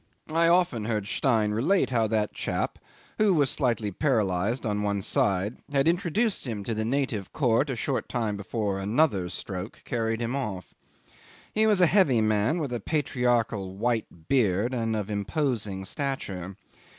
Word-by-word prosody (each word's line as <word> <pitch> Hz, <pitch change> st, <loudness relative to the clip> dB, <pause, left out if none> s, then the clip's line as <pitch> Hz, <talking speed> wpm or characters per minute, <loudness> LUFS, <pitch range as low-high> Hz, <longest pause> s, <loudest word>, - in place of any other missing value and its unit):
I 165 Hz, +1 st, +4 dB
often 170 Hz, -11 st, +2 dB
heard 105 Hz, -3 st, -1 dB
Stein 110 Hz, -3 st, +1 dB
relate 135 Hz, -, +2 dB
how 115 Hz, -3 st, +2 dB
that 105 Hz, -1 st, 0 dB
chap, -, -, -2 dB, 0.4 s
who 210 Hz, -4 st, +4 dB
was 145 Hz, -4 st, +3 dB
slightly 115 Hz, -6 st, 0 dB
paralysed 110 Hz, -, 0 dB
on 105 Hz, -1 st, 0 dB
one 100 Hz, -1 st, -1 dB
side, 100 Hz, +4 st, +1 dB
had 140 Hz, +1 st, +2 dB
introduced 180 Hz, -, +1 dB
him 105 Hz, -4 st, -4 dB
to 115 Hz, -, -2 dB
the 110 Hz, 0 st, -1 dB
native 120 Hz, -5 st, -1 dB
court 135 Hz, 0 st, +2 dB
a 130 Hz, -, -1 dB
short 130 Hz, +3 st, -2 dB
time 115 Hz, -4 st, -1 dB
before 100 Hz, 0 st, -2 dB
another 100 Hz, -, +1 dB
stroke 90 Hz, +3 st, -7 dB
carried 115 Hz, -1 st, -1 dB
him 120 Hz, +2 st, -2 dB
off. 105 Hz, -9 st, -4 dB, 0.8 s
He 220 Hz, +1 st, +3 dB
was 205 Hz, -4 st, +4 dB
a -, -, +8 dB
heavy 165 Hz, -, +4 dB
man 110 Hz, +7 st, +2 dB
with 145 Hz, -7 st, -3 dB
a 120 Hz, -, -1 dB
patriarchal 120 Hz, -, 0 dB
white 110 Hz, -8 st, -2 dB
beard, 115 Hz, -2 st, +2 dB
and 115 Hz, -2 st, -1 dB
of 105 Hz, -1 st, -3 dB
imposing 105 Hz, -2 st, -2 dB
stature. 95 Hz, -, -4 dB
115 Hz, 160 wpm, -27 LUFS, 105-140 Hz, 0.8 s, a